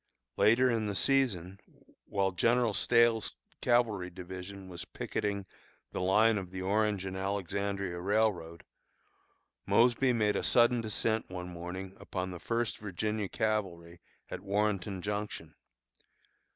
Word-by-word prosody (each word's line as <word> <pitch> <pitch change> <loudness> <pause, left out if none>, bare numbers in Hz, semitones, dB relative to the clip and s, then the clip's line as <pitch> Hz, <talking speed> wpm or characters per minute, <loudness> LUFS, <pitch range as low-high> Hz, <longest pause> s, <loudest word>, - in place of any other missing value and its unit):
Later 120 +4 +5
in 110 -2 0
the 100 - -3
season, 100 -9 +1 0.5
while 95 -1 0
General 115 +4 +2
Stahel's 115 - +3 0.3
cavalry 115 -7 +2
division 95 +2 -8
was 90 -2 -7
picketing 100 -1 -3 0.5
the - - -3
line 105 +4 +4
of 95 -2 -7
the 95 0 -5
Orange 105 0 +1
and 95 0 -4
Alexandria 100 -1 -2
Railroad, 95 -4 0 1.0
Mosby 125 +2 +4
made 105 -3 +2
a - - 0
sudden 120 0 +4
descent 110 0 -1
one 90 -1 -6
morning 90 +2 -7
upon 95 -1 -4
the 90 - -7
First 115 +7 -1
Virginia 105 +1 -2
Cavalry 85 -6 -2 0.3
at - - -6
Warrenton 100 -2 -1
Junction. 105 0 -4
100 Hz, 125 wpm, -31 LUFS, 95-110 Hz, 1.0 s, Later